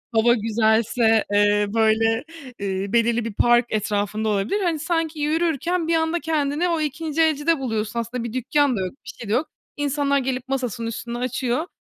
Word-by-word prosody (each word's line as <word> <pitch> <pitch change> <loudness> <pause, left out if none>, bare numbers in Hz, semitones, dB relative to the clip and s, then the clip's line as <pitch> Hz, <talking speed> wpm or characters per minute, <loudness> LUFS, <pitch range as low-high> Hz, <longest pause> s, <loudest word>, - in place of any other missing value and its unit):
hava 230 +2 +5
güzelse, 225 0 +2
eee, 205 0 +3
böyle, 225 +2 +2 0.4
ııı, 195 +1 -3
belirli 235 0 +2
bir 230 - -4
park 240 +3 +4
etrafında 210 0 -1
olabilir. 210 - 0
Hani 335 -4 0
sanki 325 -1 -2
yürürken 325 +2 0
bir 335 - +2
anda 325 +1 +1
kendini 310 +1 0
o 330 -2 0
ikinci 310 +1 -2
elcide 315 0 +2
buluyorsun. 225 -3 -2
Aslında 235 +1 -4
bir 235 -1 -5
dükkân 275 +1 +1
da - - -2
yok, 185 -1 -3
bir - - -8
şey 230 - -9
de 210 - +1
yok. 305 - +1 0.3
İnsanlar 285 -1 +1
gelip 260 -1 -2
masasının 250 -4 -2
üstünü 235 +1 -5
açıyor. 250 +4 -1
245 Hz, 175 wpm, -22 LUFS, 220-305 Hz, 0.4 s, hava